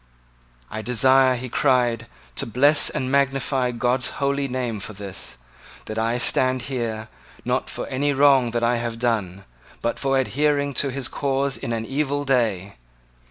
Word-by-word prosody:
"I 110 - -4
desire," 130 +3 +4
he 125 +1 -6
cried, 120 -3 +1 0.3
"to - - -1
bless 140 +6 +4
and 130 0 -3
magnify 135 -2 +1
God's 125 +1 0
holy 140 0 0
name 125 -4 -3
for 110 - -7
this, 95 -10 -7 0.5
that 110 +1 -4
I 115 +2 0
stand 130 +1 +3
here, 115 -5 -4 0.4
not - - -1
for - - -5
any 145 +3 -1
wrong 135 -3 +4
that 120 0 -2
I 120 +1 +2
have 115 -1 -4
done, 105 -6 -2 0.4
but 120 - -2
for 135 -1 +1
adhering 145 +2 0
to 140 - -2
his 135 -1 -3
cause 135 -1 -1
in - - -5
an 115 -1 -2
evil 145 +2 -1
day. 110 - 0
125 Hz, 160 wpm, -23 LUFS, 115-135 Hz, 0.5 s, desire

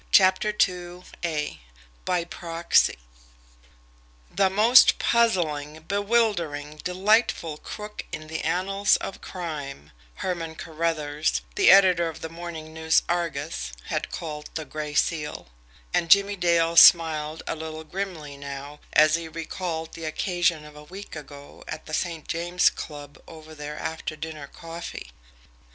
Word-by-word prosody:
CHAPTER 190 +2 +5 0.2
II 180 0 -9 1.0
BY 180 -2 +1
PROXY 170 0 +1 1.4
"The 195 +1 +3
most 225 +6 +6
puzzling 160 -10 +1
bewildering, 200 -9 0
delightful 180 -2 +1
crook 210 +6 -7
in 155 0 -6
the 160 0 -4
annals 195 +3 +2
of 195 - -7
crime," 145 - -6 0.2
Herman 165 -3 -3
Carruthers, 155 -2 -1
the 390 -3 +4
editor 185 -3 +6
of 160 - -10
the 160 - -5
MORNING 165 -2 -8
NEWS 160 0 +2
ARGUS, 160 - -2 0.2
had - - -2
called 150 -2 -6
the 155 - -3
Gray 150 -1 -5
Seal; 150 - -1 0.4
and 165 - +1
Jimmie 200 +1 +6
Dale 170 -2 +2
smiled 160 -2 +6
a - - -2
little 160 0 -7
grimly 160 -5 -5
now 140 +1 -8
as 155 0 +6
he 165 -1 0
recalled 165 0 -5
the 165 - -7
occasion 170 -1 0
of 150 0 -13
a 150 - -11
week 190 +5 -10
ago 145 -1 -11
at - - -6
the 155 - -9
St. 165 -1 -2
James 175 +2 +2
Club 145 -2 -9
over 155 -1 -12
their 150 0 -7
after 160 -1 -4
dinner 155 -2 -7
coffee. 165 - -8
165 Hz, 130 wpm, -25 LUFS, 150-180 Hz, 1.4 s, most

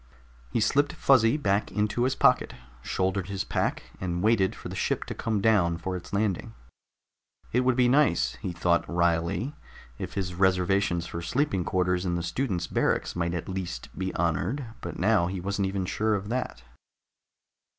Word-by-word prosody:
He 65 - 0
slipped 145 +6 +2
Fuzzy 130 -1 +4
back 100 -8 0
into 105 +3 0
his 130 +1 +1
pocket, - - +3 0.3
shouldered 95 0 -1
his 100 -1 -2
pack, - - -1 0.2
and 90 -1 -2
waited 105 -4 +3
for - - -8
the - - -6
ship - - 0
to - - -5
come 110 -3 -1
down 95 -6 +3
for 95 +2 -4
its 90 - -8
landing. 105 +2 -1 1.0
It 125 - +4
would 130 -1 +2
be 125 -1 +4
nice, 120 - +3
he 90 - -4
thought 85 0 +2
wryly, 85 - +1 0.5
if - - -5
his 95 -2 -2
reservations 95 -1 +2
for 85 - -5
sleeping 100 - 0
quarters 90 0 0
in 90 -2 -1
the 85 - -2
students' 95 -4 -1
barracks - - 0
might 85 0 -1
at 85 - -4
least 90 -10 -5
be 95 0 -2
honored, 85 - 0 0.2
but 85 - -6
now 95 -2 +3
he 95 +1 -3
wasn't 100 +1 -1
even 95 -1 -2
sure 110 +3 0
of 100 +1 -4
that. 120 - -3
95 Hz, 170 wpm, -27 LUFS, 85-110 Hz, 1.0 s, Fuzzy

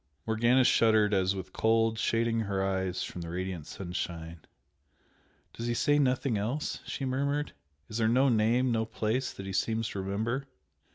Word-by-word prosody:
Morgana 120 +4 +3
shuddered 110 -3 +4
as 95 0 +2
with 95 -1 -7
cold, 115 0 +2
shading 115 0 +1
her 100 -3 -1
eyes 95 -1 -1
from 90 - -6
the 85 - -6
radiant 90 -2 -4
sunshine. 85 -2 -5 1.1
"Does 115 - -5
he 120 - 0
say 145 +4 +3
nothing 130 -4 +1
else?" 120 +9 -2
she 135 - -3
murmured 140 +3 -1 0.3
"Is 110 +1 -4
there 110 - +3
no 130 +4 +4
name 120 +2 +3
no 110 -1 +1
place 115 +3 -1
that 95 - -9
he 95 - -5
seems 110 +2 0
to 100 - -4
remember?" 110 +8 -2
110 Hz, 165 wpm, -30 LUFS, 95-120 Hz, 1.1 s, shuddered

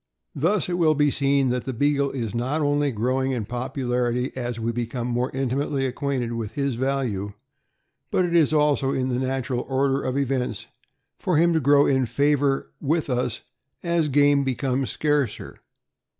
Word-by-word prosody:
Thus, 185 +6 +1
it 180 0 -2
will 155 -2 +4
be 145 0 +3
seen 140 -1 +2
that 125 0 -1
the 130 - -3
Beagle 140 +2 +1
is 115 -6 -4
not 130 +6 -1
only 145 -1 +1
growing 130 +3 0
in 115 -4 -2
popularity 125 0 -2
as 120 -2 -4
we 115 +1 -1
become 120 +1 -3
more 125 +1 -1
intimately 135 +1 -1
acquainted 130 -2 -2
with 115 -2 -4
his 140 -2 -1
value, 120 -6 -2 0.8
but 185 - +2
it 170 -1 -1
is 160 -3 +4
also 150 -3 +2
in 130 0 -1
the 125 -1 0
natural 130 -1 -2
order 135 +1 +1
of 130 +1 -2
events 130 -5 -1 0.5
for 180 -4 +1
him 170 +2 +4
to 160 - +3
grow 145 0 +4
in 130 -2 +2
favor 140 +3 +1
with 155 0 0
us 125 -2 -1 0.4
as 170 -3 +1
game 145 0 +4
becomes 130 0 -1
scarcer. 145 -7 -1
135 Hz, 165 wpm, -24 LUFS, 125-145 Hz, 0.8 s, will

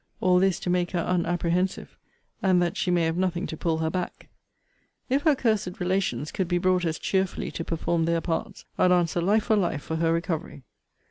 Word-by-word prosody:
All 180 -1 +4
this, 190 -1 +2
to - - -3
make 180 0 0
her 175 - +1
unapprehensive, 175 +1 -1 0.5
and 190 -4 +3
that 175 -1 0
she - - -1
may 175 -1 +2
have 165 +1 0
nothing 180 -2 0
to - - -5
pull 160 0 -1
her 160 0 -1
back. 180 0 -5 0.8
If 270 +3 +2
her 305 -1 +4
cursed 215 -6 -1
relations 180 -7 -1
could 190 - -2
be 175 0 +1
brought 180 0 +2
as 160 -1 -1
cheerfully 190 -1 -1
to 165 - -4
perform 165 0 -1
their 170 0 +1
parts, 165 0 -4
I'd 180 - +4
answer 175 -1 +2
life 210 +5 +2
for 220 - +2
life 175 -8 0
for 160 - -3
her 165 0 +2
recovery. 165 -4 -3
175 Hz, 200 wpm, -26 LUFS, 165-185 Hz, 0.8 s, All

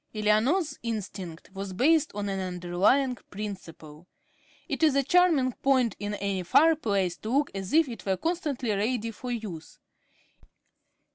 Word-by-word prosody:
Eleanor's 245 - +1
instinct 195 -7 -6
was 195 -1 -5
based 305 - +3
on 205 0 -3
an 195 -1 -2
"underlying 185 +9 +1 0.2
principle." 175 -6 -8 0.6
It - - -3
is 310 -4 +4
a 275 - +3
charming 315 -4 +3
point 255 -4 +1
in 205 0 -3
any 200 -2 -2
fireplace 200 - +2
to 215 - -7
look 280 +4 +1
as 195 -1 -5
if 320 -1 +4
it 235 -3 -8
were 190 -1 0
constantly 300 - -2
ready 225 +3 -1
for 250 +3 -8
use. 210 -10 -6
215 Hz, 140 wpm, -27 LUFS, 190-275 Hz, 0.6 s, is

